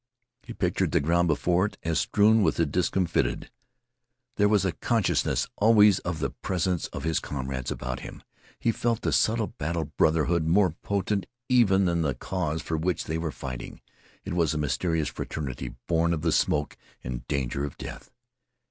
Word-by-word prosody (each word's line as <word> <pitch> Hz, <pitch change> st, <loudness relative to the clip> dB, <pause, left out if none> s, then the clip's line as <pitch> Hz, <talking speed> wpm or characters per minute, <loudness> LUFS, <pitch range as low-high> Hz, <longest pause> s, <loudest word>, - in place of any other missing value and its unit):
He -, -, -9 dB
pictured -, -, 0 dB
the -, -, +4 dB
ground 85 Hz, +4 st, +2 dB
before 90 Hz, +5 st, +2 dB
it -, -, -12 dB
as 80 Hz, -3 st, +1 dB
strewn 110 Hz, +5 st, +4 dB
with -, -, +2 dB
the 85 Hz, -, +2 dB
discomfited. 90 Hz, +2 st, 0 dB, 0.8 s
There 105 Hz, -, +3 dB
was 105 Hz, -2 st, +3 dB
a 95 Hz, -, +1 dB
consciousness 110 Hz, +5 st, 0 dB
always 105 Hz, -2 st, +6 dB
of 85 Hz, -2 st, -3 dB
the -, -, -2 dB
presence 90 Hz, -1 st, -1 dB
of -, -, -7 dB
his 80 Hz, -1 st, +1 dB
comrades 65 Hz, -2 st, -4 dB
about 65 Hz, 0 st, -4 dB
him. -, -, -10 dB, 0.4 s
He 115 Hz, -, +2 dB
felt 115 Hz, 0 st, -1 dB
the -, -, +1 dB
subtle 110 Hz, 0 st, +2 dB
battle 80 Hz, +1 st, -1 dB
brotherhood 80 Hz, +1 st, +2 dB
more 95 Hz, +1 st, +4 dB
potent 100 Hz, +3 st, -2 dB, 0.2 s
even 100 Hz, -7 st, +4 dB
than 85 Hz, -1 st, +1 dB
the 70 Hz, -5 st, 0 dB
cause 80 Hz, +1 st, -3 dB
for 80 Hz, -, -2 dB
which 85 Hz, +1 st, -1 dB
they 80 Hz, +1 st, -3 dB
were 80 Hz, -1 st, -2 dB
fighting. 65 Hz, -2 st, -7 dB, 0.5 s
It -, -, -4 dB
was 85 Hz, -3 st, +1 dB
a -, -, 0 dB
mysterious 75 Hz, +3 st, 0 dB
fraternity 70 Hz, -5 st, -5 dB
born 85 Hz, 0 st, +2 dB
of 75 Hz, -, -6 dB
the 85 Hz, -, +2 dB
smoke 75 Hz, -1 st, +1 dB, 0.3 s
and -, -, -6 dB
danger 70 Hz, -1 st, -1 dB
of 70 Hz, -2 st, -5 dB
death. -, -, -9 dB
85 Hz, 175 wpm, -27 LUFS, 75-95 Hz, 0.8 s, always